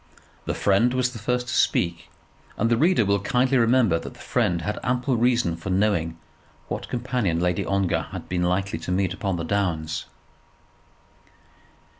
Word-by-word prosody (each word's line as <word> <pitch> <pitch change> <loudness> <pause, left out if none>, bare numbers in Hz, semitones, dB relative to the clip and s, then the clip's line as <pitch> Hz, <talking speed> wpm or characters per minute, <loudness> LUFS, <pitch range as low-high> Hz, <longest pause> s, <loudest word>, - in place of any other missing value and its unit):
The - - -2
friend 115 +6 +2
was 125 0 +1
the 115 - -7
first 125 +3 -1
to 120 - -3
speak; 85 -7 +1 0.5
and 115 +2 +1
the - - +5
reader 160 - +3
will 100 0 +2
kindly 125 +5 +2
remember 115 -7 +3
that - - -9
the - - -17
friend 85 -2 0
had 105 +5 -3
ample 125 +1 0
reason 120 -7 +2
for 85 +3 -7
knowing 90 -4 +1 0.5
what - - -4
companion 120 -8 -1
Lady 90 0 0
Ongar 95 -5 0
had - - -7
been 90 -1 -1
likely 90 0 0
to 85 - -5
meet 95 0 +1
upon 95 -1 -2
the 85 - -3
downs. 80 -5 -1
100 Hz, 165 wpm, -24 LUFS, 90-120 Hz, 0.5 s, the